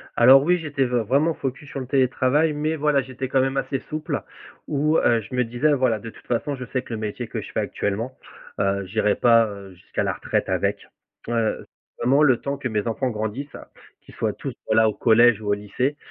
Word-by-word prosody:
Alors, 130 +3 +7
oui, 180 +3 +3
j'étais 145 -4 -1
vr 120 -2 0
vraiment 145 +7 +2
focus 135 +1 -5
sur 140 - -5
le 130 - -6
télétravail 135 +3 +2
mais, 155 +2 -1
voilà, 150 -2 +2
j'étais 130 0 -6
quand 130 0 +3
même 135 +1 -1
assez 135 0 -1
souple 155 0 -3 0.5
où, 150 +2 +1
heu, 115 -2 +3
je 115 - -12
me 125 - +2
disais, 120 +6 +1
voilà: 125 -5 +1
«De 115 - -8
toute - - -17
façon, 135 +4 -1
je 130 - -7
sais 130 +1 -2
que 120 - -9
le 110 - -3
métier 105 -2 -4
que - - -4
je - - -10
fais - - -1
actuellement, 110 +6 -3 0.4
heu, 100 0 0
j'irai 105 +2 +1
pas, 115 -1 +5
heu, 100 -2 -9
jusqu'à 90 - -4
la - - 0
retraite - - -2
avec», - - -1 0.4
heu, 115 -2 -1 0.3
vraiment 140 +5 +3
le 130 -5 +5
temps 140 0 -3
que 130 - -3
mes 110 -1 -2
enfants 125 +3 -1
grandissent, 110 +6 -4 0.5
qu'ils - - -17
soient - - -1
tous, - - -6
voilà, 110 0 +4
au 105 - -3
collège 115 -1 +4
ou 105 - -7
au - - +4
lycée 125 +8 -2
125 Hz, 220 wpm, -23 LUFS, 110-140 Hz, 0.5 s, Alors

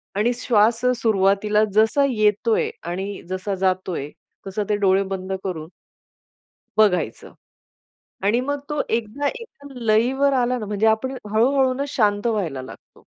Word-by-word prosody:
आणि 230 +4 +2
श्वास 230 -1 +2 0.2
सुरुवातीला 210 0 +2
जसा 220 +6 +4
येतोय 215 0 +1 0.2
आणि 195 +3 -4
जसा 185 +1 -3
जातोय, 185 -5 -1 0.4
तसं 205 +2 -2
ते 210 - +2
डोळे 195 -1 +3
बंद 190 0 -3
करून 160 -4 -4 1.1
बघायचं. 180 -7 +1 0.9
आणि 225 +5 +3
मग 285 +2 -2
तो 295 -1 -1
एकदा 230 +5 -1
एका 470 -10 -9
लईवर 245 +6 +2
आला 250 0 +1
ना 215 - -5
म्हणजे 210 +2 0
आपण 260 +5 +1 0.2
हळू-हळू 260 +4 +3
ना 280 +2 -2
शांत 210 -5 +1
व्हायला 175 - -1
लागतो. 130 - -14
215 Hz, 130 wpm, -22 LUFS, 195-245 Hz, 1.1 s, जसा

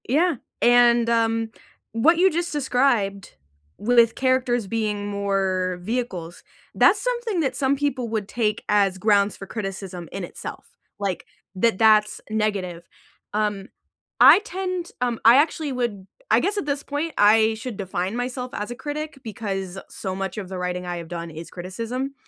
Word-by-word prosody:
Yeah, 325 +5 +3 0.3
and, 240 -1 +5
um, 225 -1 +1 0.4
what 310 +10 +4
you 375 +2 +5
just 345 +2 -2
described 245 -8 0 0.4
with 235 +1 +4
characters 255 -4 +1
being 210 -2 -2
more 195 -3 -1
vehicles, 185 -6 -4 0.3
that's 405 - +5
something 475 -5 -1
that 265 -4 -1
some 270 0 +1
people 275 -4 -1
would 215 -3 -2
take 215 -1 -1
as 200 -2 +3
grounds 200 0 +3
for 195 - -8
criticism 195 -5 -6
in 195 - -5
itself, 175 - -8 0.3
like, 195 -4 -2 0.3
that 220 +2 +2
that's 215 -1 +4
negative. 195 -6 -2 0.5
Um, 210 -2 -1 0.5
I - - +10
tend 370 -3 -4
um, 240 -2 0
I 230 +2 +9
actually 300 0 +1
would 225 -6 -3 0.2
I - - +5
guess 410 +1 -1
at 405 - -1
this 285 -1 -2
point, 295 +3 -3
I 220 +1 +5
should 235 +1 -6
define 190 +1 -3
myself 250 +1 -3
as 210 +3 -4
a - - -5
critic 295 +2 -5
because 195 -4 -4
so 190 -1 -5
much 195 0 -4
of 200 -3 -5
the 190 - -5
writing 180 0 -3
I 175 0 -3
have 165 -1 -8
done 170 -1 -5
is 160 +2 -9
criticism, 230 +9 -5
220 Hz, 160 wpm, -23 LUFS, 195-260 Hz, 0.5 s, I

